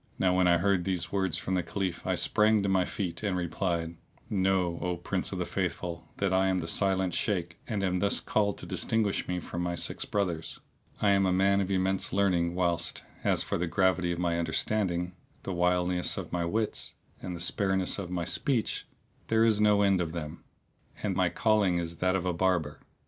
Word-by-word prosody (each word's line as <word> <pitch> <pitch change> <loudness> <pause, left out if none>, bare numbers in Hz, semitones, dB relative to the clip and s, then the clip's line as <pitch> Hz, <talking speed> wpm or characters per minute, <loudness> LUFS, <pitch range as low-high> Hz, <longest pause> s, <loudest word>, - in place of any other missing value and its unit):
Now 90 -1 +2
when 90 -1 +4
I 85 -1 +5
heard 95 0 +2
these 85 -2 -2
words 95 -4 0
from 95 - -3
the 90 - +2
Caliph 95 -2 -3
I 95 - +2
sprang 105 +3 +3
to - - 0
my 95 -1 +3
feet 90 -5 -4
and 100 -4 -1
replied, 85 -1 -2 0.3
"Know, 95 -3 +1
O 90 -1 -1
Prince 85 - -2
of - - -4
the - - -1
Faithful, 85 -1 -3
that 95 -1 0
I 95 +1 +3
am 95 -1 +1
the 85 - -4
Silent 95 0 +1
Shaykh 85 -5 -2
and 105 -3 -2
am 90 -1 +1
thus 100 +1 +2
called 100 -2 0
to - - -8
distinguish 110 -3 0
me 90 0 -1
from 85 +1 -5
my 90 0 -1
six - - -3
brothers. 90 -6 -2 0.4
I 100 - +5
am 100 -1 +3
a - - +2
man 100 +2 +3
of 95 - -2
immense 95 0 +1
learning 90 -3 +2
whilst, 85 -2 0 0.2
as - - +3
for - - -2
the 85 - 0
gravity 95 0 +2
of 85 - -2
my 85 -1 0
understanding, 90 +1 0 0.3
the 95 - -3
wiliness 90 0 +2
of - - -6
my 85 -1 0
wits 110 +5 -2 0.3
and 90 - -5
the - - -7
spareness 95 +2 +1
of 95 -3 -5
my 90 -2 -2
speech, 105 - -1 0.4
there 115 0 +3
is 110 -2 +3
no 105 -1 +4
end 95 -2 +3
of 80 -2 -3
them; 75 -3 -6 0.6
and - - 0
my - - +2
calling 105 -5 +2
is 85 -1 -4
that 90 +2 +1
of 90 -1 -1
a 90 - 0
barber. 85 -4 0
90 Hz, 205 wpm, -29 LUFS, 85-100 Hz, 0.6 s, I